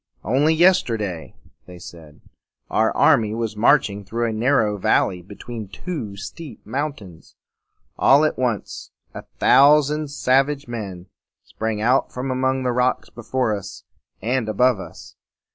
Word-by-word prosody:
"Only 140 Hz, -, +2 dB
yes 180 Hz, +3 st, +5 dB
ter 115 Hz, -2 st, -3 dB
day," 90 Hz, -6 st, -6 dB, 0.3 s
they 90 Hz, -1 st, -11 dB
said, 80 Hz, -3 st, -13 dB, 0.5 s
"our -, -, +2 dB
army 110 Hz, -1 st, +3 dB
was 115 Hz, -2 st, -3 dB
marching 105 Hz, -2 st, +2 dB
through 115 Hz, +4 st, -2 dB
a 110 Hz, -, -3 dB
narrow 110 Hz, -3 st, +1 dB
valley 90 Hz, -1 st, +1 dB
between 105 Hz, +4 st, -9 dB
two 115 Hz, -, -6 dB
steep 115 Hz, -, -10 dB
mountains. 115 Hz, -, -6 dB, 0.6 s
All 140 Hz, +3 st, +5 dB
at 155 Hz, -, 0 dB
once 120 Hz, -5 st, -3 dB, 0.2 s
a -, -, -9 dB
thou 145 Hz, +2 st, +6 dB
sand 150 Hz, +1 st, -3 dB
sav 135 Hz, -1 st, +2 dB
age 140 Hz, -3 st, -6 dB
men 100 Hz, -7 st, -7 dB, 0.4 s
sprang 110 Hz, -1 st, -4 dB
out 125 Hz, +4 st, +2 dB
from 130 Hz, +1 st, -4 dB
among 130 Hz, 0 st, 0 dB
the 125 Hz, -, 0 dB
rocks 125 Hz, +1 st, 0 dB
before 120 Hz, -1 st, -2 dB
us 100 Hz, -1 st, -9 dB, 0.4 s
and 120 Hz, 0 st, -1 dB
above 125 Hz, 0 st, +2 dB
us. -, -, -11 dB
120 Hz, 145 wpm, -21 LUFS, 105-135 Hz, 0.6 s, thou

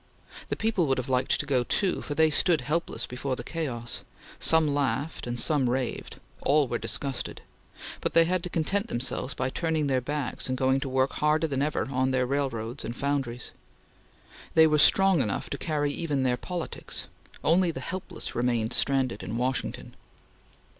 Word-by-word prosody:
The -, -, 0 dB
people 215 Hz, -7 st, +1 dB
would 135 Hz, -1 st, +2 dB
have 130 Hz, 0 st, -3 dB
liked 130 Hz, 0 st, +2 dB
to -, -, -1 dB
go 130 Hz, -4 st, +2 dB
too, 185 Hz, -, +1 dB
for 145 Hz, -, -5 dB
they 160 Hz, 0 st, +4 dB
stood 165 Hz, -1 st, +3 dB
helpless 155 Hz, +7 st, -1 dB
before 130 Hz, +1 st, -3 dB
the 120 Hz, -, -7 dB
chaos; 120 Hz, -7 st, -4 dB, 0.4 s
some 160 Hz, -3 st, +4 dB
laughed 145 Hz, +1 st, -1 dB
and 120 Hz, 0 st, -2 dB
some 140 Hz, -4 st, +3 dB
raved; 125 Hz, 0 st, -2 dB, 0.3 s
all 145 Hz, 0 st, +3 dB
were 120 Hz, -1 st, -2 dB
disgusted; 135 Hz, -2 st, -3 dB, 0.6 s
but -, -, -2 dB
they 165 Hz, 0 st, +7 dB
had 180 Hz, +1 st, 0 dB
to 180 Hz, -, -5 dB
content 195 Hz, +6 st, 0 dB
themselves 125 Hz, +2 st, -2 dB
by 130 Hz, 0 st, -1 dB
turning 160 Hz, -2 st, 0 dB
their 130 Hz, -2 st, +1 dB
backs 145 Hz, 0 st, -3 dB
and 130 Hz, -, -1 dB
going 130 Hz, +1 st, +2 dB
to 135 Hz, -, -4 dB
work 130 Hz, +1 st, +1 dB
harder 150 Hz, +2 st, +2 dB
than 140 Hz, -4 st, -1 dB
ever 150 Hz, +1 st, 0 dB
on 130 Hz, 0 st, +1 dB
their 130 Hz, -1 st, +1 dB
railroads 130 Hz, -3 st, -2 dB
and 120 Hz, -, -5 dB
foundries. 135 Hz, -3 st, -2 dB, 1.0 s
They 160 Hz, -, +8 dB
were 155 Hz, -1 st, +3 dB
strong 195 Hz, 0 st, +6 dB
enough 105 Hz, -5 st, -2 dB
to 140 Hz, -, -2 dB
carry 145 Hz, -3 st, 0 dB
even 145 Hz, -5 st, -1 dB
their 125 Hz, -1 st, +2 dB
politics. 175 Hz, +6 st, -5 dB, 0.4 s
Only 175 Hz, +3 st, +4 dB
the 165 Hz, -, -4 dB
helpless 185 Hz, +1 st, -5 dB
remained 120 Hz, -1 st, 0 dB
stranded 130 Hz, -5 st, +1 dB
in 110 Hz, -, -4 dB
Washington. 125 Hz, +2 st, -2 dB
140 Hz, 175 wpm, -27 LUFS, 125-160 Hz, 1.0 s, They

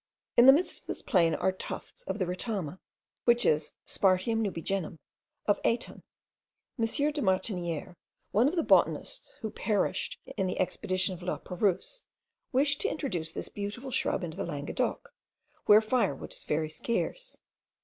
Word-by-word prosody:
In 240 Hz, -, +8 dB
the -, -, +13 dB
midst 320 Hz, +7 st, +1 dB
of -, -, -29 dB
this -, -, -5 dB
plain 170 Hz, -4 st, +3 dB
are 190 Hz, -, +2 dB
tufts 190 Hz, -, -7 dB
of -, -, -2 dB
the 185 Hz, -, 0 dB
retama, 185 Hz, -2 st, -3 dB, 0.5 s
which 240 Hz, 0 st, +4 dB
is 150 Hz, 0 st, +2 dB
the -, -, -4 dB
Spartium 195 Hz, +4 st, +3 dB
nubigenum 190 Hz, -3 st, -2 dB, 0.5 s
of 205 Hz, -, +2 dB
Aiton. 235 Hz, +1 st, -1 dB, 0.8 s
M. 225 Hz, -, +3 dB, 0.3 s
de 295 Hz, 0 st, -3 dB
Martiniere, 185 Hz, -, -1 dB, 0.4 s
one 230 Hz, +5 st, +4 dB
of 315 Hz, -, 0 dB
the 335 Hz, -, +2 dB
botanists -, -, +2 dB
who 220 Hz, -2 st, -3 dB
perished 210 Hz, -1 st, -1 dB, 0.2 s
in 190 Hz, -2 st, +1 dB
the 185 Hz, -, -3 dB
expedition 185 Hz, 0 st, 0 dB
of 180 Hz, -, -8 dB
Laperouse, 185 Hz, -, -1 dB, 0.5 s
wished 275 Hz, +2 st, +2 dB
to -, -, +1 dB
introduce 180 Hz, -, -3 dB
this -, -, -5 dB
beautiful 210 Hz, +6 st, -5 dB
shrub 250 Hz, -, 0 dB
into 175 Hz, +3 st, -4 dB
Languedoc, 150 Hz, -, -3 dB, 0.5 s
where 210 Hz, +1 st, +9 dB
firewood 220 Hz, -, 0 dB
is -, -, -8 dB
very 155 Hz, +1 st, 0 dB
scarce. -, -, -2 dB
200 Hz, 150 wpm, -30 LUFS, 180-240 Hz, 0.8 s, the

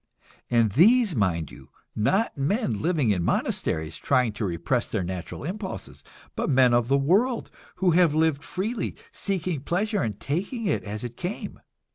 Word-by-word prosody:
And 115 Hz, -3 st, +3 dB
these, 210 Hz, -, +5 dB
mind 85 Hz, -, 0 dB
you, 65 Hz, +3 st, -14 dB, 0.3 s
not 190 Hz, -, +1 dB
men 140 Hz, -, 0 dB
living 155 Hz, -9 st, +2 dB
in 90 Hz, -3 st, +1 dB
monasteries, 80 Hz, -1 st, -1 dB
trying 125 Hz, -5 st, +2 dB
to 105 Hz, +1 st, -3 dB
repress 85 Hz, +7 st, -1 dB
their 105 Hz, -4 st, -1 dB
natural 90 Hz, +5 st, -5 dB
impulses, 190 Hz, +5 st, -6 dB, 0.3 s
but -, -, -1 dB
men 130 Hz, -3 st, +5 dB
of 120 Hz, -1 st, +3 dB
the 135 Hz, +2 st, +3 dB
world, 205 Hz, -, +1 dB, 0.2 s
who 185 Hz, -2 st, +2 dB
have 170 Hz, -3 st, +4 dB
lived 155 Hz, -3 st, +2 dB
freely, 215 Hz, +5 st, -3 dB, 0.2 s
seeking 185 Hz, -5 st, -2 dB
pleasure 200 Hz, +7 st, 0 dB
and 105 Hz, -3 st, -3 dB
taking 195 Hz, -, -3 dB
it 195 Hz, -, 0 dB
as 105 Hz, +1 st, -5 dB
it 120 Hz, -1 st, -6 dB
came. 180 Hz, +4 st, -5 dB
140 Hz, 160 wpm, -26 LUFS, -, 0.3 s, these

